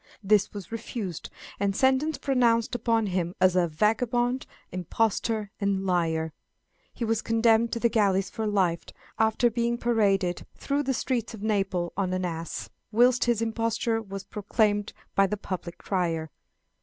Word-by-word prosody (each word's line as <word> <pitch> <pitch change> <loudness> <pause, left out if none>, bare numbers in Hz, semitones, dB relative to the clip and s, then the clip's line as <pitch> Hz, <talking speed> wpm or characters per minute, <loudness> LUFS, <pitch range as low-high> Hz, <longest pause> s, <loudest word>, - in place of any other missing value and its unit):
This 200 0 +3
was 200 -2 -8
refused, 215 -6 -5 0.3
and 200 -1 0
sentence 265 +5 +2
pronounced 240 -4 +2
upon 230 -2 +1
him 180 -2 -2
as 185 -1 +4
"a 180 -1 +3
vagabond, 240 +8 +1 0.2
impostor, 210 +3 -1
and 195 -1 0
liar;" 165 -3 +1
and 160 - -6 0.6
he 235 - -4
was 225 0 0
condemned 225 0 +3
to 235 - -1
the 235 - +3
galleys 200 -4 +2
for 220 -1 -3
life, 185 -5 +1 0.4
after 220 +2 +3
being 235 +1 0
paraded 200 -7 +1
through 285 +1 0
the 270 -2 -1
streets 235 -2 -2
of 210 - -10
Naples 195 -5 0
on 185 -2 -1
an 185 0 -1
ass, 165 -1 -4 0.2
whilst 245 +3 +4
his 235 -2 +1
imposture 225 0 0
was 195 -2 -7
proclaimed 205 0 0 0.2
by 195 0 +4
the 210 - -2
public 185 -3 -6
crier. 165 -5 -2
210 Hz, 155 wpm, -27 LUFS, 185-230 Hz, 0.6 s, as